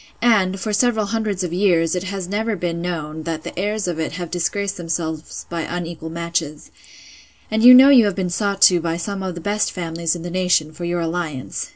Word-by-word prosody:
and, 195 -5 +3
for 210 +4 -3
several 220 0 +2
hundreds 210 -3 -2
of 175 -2 -4
years, 175 -4 +2
it 180 - -1
has 190 -1 -4
never 215 +3 -1
been 170 -2 -3
known, 160 -3 -4
that 160 -1 -4
the - - -7
heirs 210 0 -1
of 170 -2 -3
it 160 - -3
have 175 -1 -6
disgraced 200 +3 -1
themselves 165 -2 -4
by 170 -1 -4
unequal 170 -1 -5
matches: 165 -2 -4 0.8
And 220 0 +1
you 250 +1 +11
know 265 +2 +8
you 250 -5 +7
have 200 -3 -1
been 185 -2 -2
sought 200 +2 0
to 180 -2 +7
by 165 0 -2
some 195 +3 -4
of 185 -2 -4
the 175 - -7
best 205 +4 0
families 170 -1 -2
in 170 - -7
the 175 - -5
nation, 180 -4 +1
for 175 +2 -6
your 175 0 -1
alliance. 165 -5 -4
175 Hz, 215 wpm, -20 LUFS, 165-200 Hz, 0.8 s, you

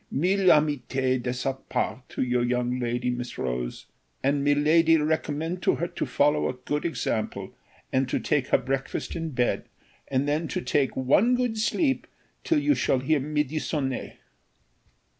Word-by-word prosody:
"Mille 185 +6 +1
amitiés 135 -5 +2
de 125 - -2
sa 125 +2 -1
part 130 -1 -3
to - - -2
your 125 -1 +1
young 125 +1 0
lady, 120 0 -1
Miss 125 0 -5
Rose, - - -3 0.4
and 140 +1 +2
miladi 155 +3 +4
recommend 155 +2 -1
to - - +2
her 170 - -2
to - - -3
follow 150 +1 +2
a - - -2
good 145 +5 -3
example, 115 -9 -2 0.4
and 130 0 +1
to - - 0
take 145 -4 0
her - - +4
breakfast 135 +1 -3
in 165 - -3
her - - -3
bed, 125 -4 0 0.4
and 135 +1 0
then 155 +3 0
to - - -2
take 135 +2 0
one 185 - +4
good 245 -2 0
sleep 265 +6 0 0.4
till 325 - +2
you 295 0 +3
shall 135 - +1
hear 140 +4 +1
midi 150 +1 -1
sonné." 135 -4 -2
145 Hz, 165 wpm, -26 LUFS, 125-160 Hz, 0.4 s, miladi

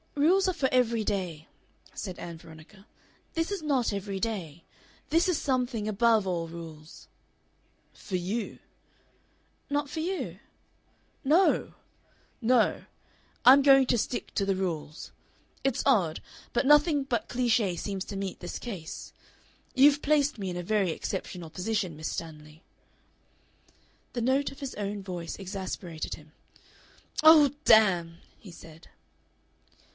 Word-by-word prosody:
"Rules 360 +7 +4
are 370 - +1
for 280 -6 0
every 235 -3 +2
day," 180 -7 -3 0.5
said 185 -3 -6
Ann 170 -1 -7
Veronica. 165 +5 -15 0.5
"This 330 +3 -1
is 400 -4 -3
not 270 -8 0
every 200 -1 -4
day. 180 -8 -4 0.5
This 335 +3 +3
is 350 - +1
something 250 -5 -1
above 215 0 +3
all 170 -3 -2
rules." 160 -2 -11 0.9
"For 190 - -6
you." 195 +6 -3 1.1
"Not 290 0 -1
for 320 - -5
you?" 360 +4 -3 0.8
"No. 320 +8 +3 0.7
No; 245 +2 +2 0.6
I'm 270 +3 +9
going 270 -1 +6
to 240 - +2
stick 240 - -3
to 200 - 0
the 195 -1 +1
rules.... 165 -5 -4 0.5
It's 270 -3 0
odd, 185 - +3 0.3
but 245 - +1
nothing 295 0 +5
but 240 -5 -2
cliche 235 -6 +1
seems 195 +1 -4
to 200 - -7
meet 195 -1 -4
this 175 - -6
case. 190 -10 -7 0.6
You've 285 +2 +6
placed 290 -4 +2
me 195 -2 -3
in 175 - -4
a 175 - -4
very 200 0 +1
exceptional 175 -1 -5
position, 185 -1 -2
Miss 155 +1 -4
Stanley." 155 0 -8 1.5
The 240 - -2
note 265 +4 +1
of 275 - -13
his 275 -2 -5
own 205 -1 -4
voice 175 -3 -6
exasperated 185 -4 -5
him. 150 0 -17 0.9
"Oh, 310 -3 +8
damn!" 175 -6 +5 0.2
he 195 - -12
said. 165 0 -14
210 Hz, 130 wpm, -28 LUFS, 175-270 Hz, 1.5 s, I'm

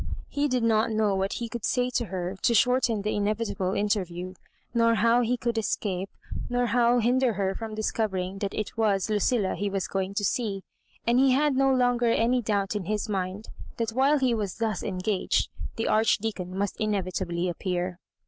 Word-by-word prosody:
He 290 +1 0
did 250 -3 0
not 225 0 +3
know 215 -2 +1
what 195 0 -1
he 235 - -3
could 230 -1 -6
say 250 -1 +1
to 240 -1 0
her 185 -1 -4
to 235 - +3
shorten 245 -2 +3
the 210 - 0
inevi 210 +2 0
table 185 0 -2
interview, 185 -3 -1 0.4
nor 230 -1 +4
how 230 +3 +4
he 245 +1 +1
could 235 -1 -1
escape, 195 -3 -2 0.4
nor 245 0 +1
how 240 +1 +3
hinder 245 +1 +2
her 195 -1 -1
from 220 +1 -6
discovering 195 -3 -2
that 200 -1 -3
it 215 - -4
was 215 -2 +1
Lucilla 210 -1 +1
he 205 0 -2
was 195 -1 -2
g^ing 195 0 -2
to 205 - 0
see; 200 -2 -1 0.4
and 240 +2 +3
he 265 -1 +5
had 290 +1 +2
no 270 0 +3
longer 245 -2 +2
any 235 +2 +2
doubt 205 -2 -1
in 205 -4 -2
his 210 +3 -1
mind 195 +1 -3 0.3
that 230 -1 -1
while 270 +5 +3
he 260 -3 +2
was 210 -4 -3
thus 220 -4 -1
engaged 190 +1 0 0.3
the 225 - -2
Archdeacon 210 -4 +1
must 200 0 -1
inevitably 185 -4 -1
appear. 180 0 -2
215 Hz, 185 wpm, -27 LUFS, 195-235 Hz, 0.4 s, he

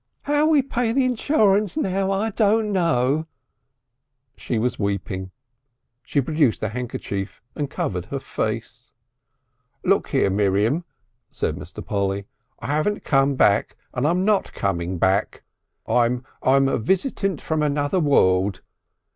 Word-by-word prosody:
"'Ow 295 +1 +3
we'll 300 -4 +4
pay 245 -3 -1
back 225 - -1
the 270 -1 +3
insurance 215 - +2
now 195 -7 0
I 200 +3 0
don't 215 0 +2
know." 160 -4 +1 1.1
She 120 - -3
was 120 +3 -1
weeping. 100 -2 -2 0.7
She 140 - 0
produced 145 -5 +1
a 110 - 0
handkerchief 110 -4 -5
and 145 -3 -3
covered 90 -8 -3
her - - -3
face. - - -4 0.9
"Look - - +2
here, 95 - +1
Miriam," 105 - +1 0.4
said - - -2
Mr. - - -9
Polly. 100 -1 -1 0.3
"I - - -9
haven't 155 - 0
come 135 0 +2
back 100 -4 +2 0.2
and 130 +3 0
I'm 180 +4 +1
not 210 -2 +1
coming 90 -2 -2
back. 95 +4 +1 0.4
I'm 120 +1 +2 0.2
I'm 135 +1 +4
a 135 - 0
Visitant 190 - 0
from 160 -1 -1
Another 145 +3 +1
World. 95 - +3
140 Hz, 135 wpm, -23 LUFS, -, 1.1 s, we'll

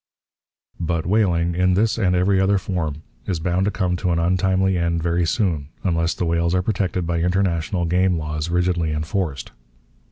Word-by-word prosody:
But 85 -1 -1
whaling, 90 -4 +2
in 90 +1 +2
this 110 +3 +1
and 90 -4 +2
every 95 +2 +2
other 100 +1 +3
form, 80 -6 -3 0.2
is 90 -4 -1
bound 90 +3 0
to - - +2
come 90 -3 -1
to 90 0 -1
an 85 - +1
untimely 95 +2 +1
end 85 -1 0
very 85 0 +1
soon 80 -9 0 0.2
unless 85 -2 0
the 90 - -2
whales 85 +1 +1
are 90 - +1
protected 95 -3 -1
by 85 0 -1
international 90 -1 0
game 90 +1 +2
laws 75 +1 -3
rigidly 85 -2 0
enforced. 75 -3 -3
90 Hz, 170 wpm, -21 LUFS, 85-95 Hz, 0.2 s, other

